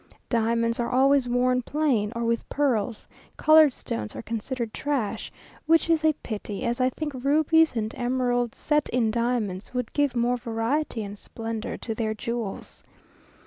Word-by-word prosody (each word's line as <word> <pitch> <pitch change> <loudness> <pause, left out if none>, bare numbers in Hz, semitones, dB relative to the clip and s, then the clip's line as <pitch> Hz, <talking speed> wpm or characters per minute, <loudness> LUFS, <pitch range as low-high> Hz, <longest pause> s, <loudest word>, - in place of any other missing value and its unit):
Diamonds 230 0 +1
are 235 - 0
always 270 0 +3
worn 250 +1 +2
plain 250 -7 0
or 235 0 -1
with 230 0 -1
pearls; 245 -6 0 0.3
coloured 310 -1 +7
stones 110 - -5
are 110 - -6
considered 230 +1 -4
trash, 275 -8 -2 0.4
which 330 +1 +4
is 320 -1 +2
a 315 0 +4
pity, 210 -1 -5
as 240 0 -1
I 255 - +4
think 295 +3 -5
rubies 315 +2 +4
and 220 -1 -2
emeralds 245 -1 0
set 300 -1 +1
in 230 -3 +1
diamonds 230 -3 -2
would 250 -2 -2
give 285 -3 +1
more 240 +1 +1
variety 230 +2 -1
and 200 0 -7
splendour 225 +2 -5
to 225 - -4
their 220 -1 -2
jewels. 230 -2 -5
240 Hz, 155 wpm, -26 LUFS, 225-275 Hz, 0.4 s, coloured